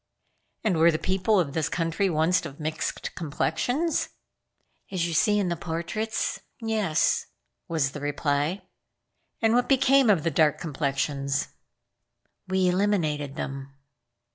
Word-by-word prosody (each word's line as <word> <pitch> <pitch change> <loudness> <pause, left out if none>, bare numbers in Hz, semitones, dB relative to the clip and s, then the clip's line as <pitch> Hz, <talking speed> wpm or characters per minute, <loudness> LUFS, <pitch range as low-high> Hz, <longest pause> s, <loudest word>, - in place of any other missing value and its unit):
"And 195 -6 +1
were 165 +1 +7
the 155 - +1
people 190 +4 +1
of 145 -6 -1
this 160 -1 0
country 165 +4 0
once 165 +2 +2
of 140 - -8
mixed 155 0 -3
complexions?" 170 - -1 0.8
"As 180 -3 0
you 170 - -3
see 210 +6 +3
in 195 -3 +1
the 170 - 0
portraits? 170 +7 -3 0.2
Yes," 220 -8 +1 0.4
was 155 -5 0
the 145 - -7
reply. 145 +5 -1 0.8
"And 225 0 +4
what 245 +1 +2
became 270 -2 +5
of 185 -7 +4
the 165 - +1
dark 155 -2 +3
complexions?" 140 -2 -1 1.0
"We 190 0 +2
eliminated 170 -7 0
them." 135 0 -6
165 Hz, 130 wpm, -26 LUFS, 150-200 Hz, 1.0 s, were